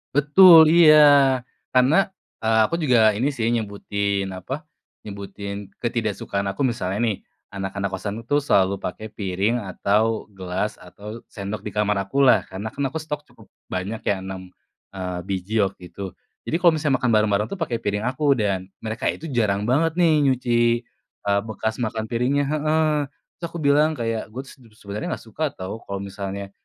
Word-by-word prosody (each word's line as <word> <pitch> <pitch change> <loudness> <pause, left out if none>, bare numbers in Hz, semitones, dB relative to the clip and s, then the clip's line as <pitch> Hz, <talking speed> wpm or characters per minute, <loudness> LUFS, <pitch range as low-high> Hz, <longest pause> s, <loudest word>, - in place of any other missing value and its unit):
Betul, 160 +3 +8
iya. 155 -3 +8 0.8
Karena, 155 +11 +4 0.3
eee, 110 0 +2
aku 165 - -2
juga 115 -7 +4
ini 125 +7 0
sih 120 -6 -3
nyebutin 100 -2 -2
apa, 135 - -6 0.4
nyebutin 100 0 -7
ketidaksukaan 105 -4 -2
aku 135 +8 -1
misalnya 100 -6 -1
nih, 110 -4 0 0.4
anak-anak 100 0 -3
kosanku 100 +4 -4
tuh 145 +4 +2
selalu 100 -8 +2
pakai 110 +4 -5
piring 100 +4 -1
atau 110 +4 +1
gelas 95 +3 -3
atau 105 +5 -10
sendok 100 0 -5
di 105 - -5
kamar 105 0 0
akulah. 125 +1 +4
Karena 100 +4 -6
kan 140 - -3
aku 140 - -4
stok 150 -2 -5
cukup - - -20 0.2
banyak 95 +5 -4
ya 100 - 0
6, 95 -1 -7 0.4
eee, 90 -2 -5
biji 100 +4 0
waktu 95 -1 -2
itu. 100 -1 -5 0.3
Jadi - - -3
kalau 175 -1 +5
misalnya 150 -4 +1
makan 125 -2 0
bareng-bareng 105 -1 +2
tuh 200 - -6
pakai 125 -8 -1
piring 105 -1 -2
aku 140 +2 +2
dan 100 -6 -1 0.2
mereka 110 +1 -4
itu 165 0 -8
jarang 105 -6 +1
banget 160 +5 +2
nih 170 -2 +3
nyuci, 125 -3 +1 0.6
eee, 100 0 +1
bekas 110 0 -3
makan 110 -2 -3
piringnya. 125 +4 +1
Heeh. 155 +1 +1 0.5
Terus 170 - -5
aku 170 - -5
bilang 150 +2 +3
kayak, 115 -4 -2
"Gue 130 - -4
tuh 135 0 -14
sedu 125 - -19
sebenernya 105 0 -5
nggak - - -6
suka 150 +3 -2
tau 95 +3 -6
kalo 100 0 -5
misalnya 100 0 -6
110 Hz, 165 wpm, -23 LUFS, 100-135 Hz, 0.8 s, Betul